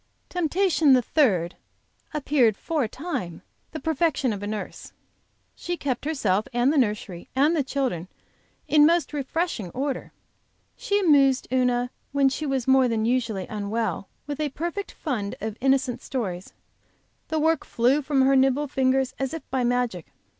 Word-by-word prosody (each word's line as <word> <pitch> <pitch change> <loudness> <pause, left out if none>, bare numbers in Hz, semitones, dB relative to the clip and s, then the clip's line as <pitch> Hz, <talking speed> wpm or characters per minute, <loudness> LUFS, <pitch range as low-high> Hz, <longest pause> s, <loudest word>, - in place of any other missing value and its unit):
Temptation 345 -3 +2
the 250 -1 +4
third 190 - +2 0.6
appeared, 270 -8 +2
for 315 -4 -1
a - - -6
time, 260 - -5 0.3
the 315 - -5
perfection 310 -4 0
of 200 - -6
a 205 - -4
nurse. 210 0 -6 0.6
She 350 0 -4
kept 270 -3 -3
herself 215 -10 0
and 245 +4 +2
the - - +1
nursery 210 -7 -2
and 295 +5 +3
the 300 - +1
children 255 -11 -2 0.6
in 300 0 +6
most 340 -1 +1
refreshing 290 - -2
order; 270 0 -3 0.6
she 405 0 0
amused 280 -7 +4
Una 250 -1 +1 0.2
when 280 -1 +4
she 295 +3 -3
was 265 -3 -1
more 265 -1 +5
than 225 -2 0
usually 230 -6 0
unwell 210 -2 -3 0.2
with 290 -1 -5
a 305 -1 0
perfect 345 +8 -4
fund 220 - -3
of 215 0 -4
innocent 265 -2 +1
stories; 195 -9 -4 0.7
the 315 - -2
work 320 0 +2
flew 250 +5 +2
from 275 -1 +2
her 270 +1 +4
nimble 270 +2 +3
fingers 265 -1 +1
as 270 +3 -2
if 320 - -9
by 260 -1 0
magic. 240 -8 -1
265 Hz, 155 wpm, -25 LUFS, 230-300 Hz, 0.7 s, in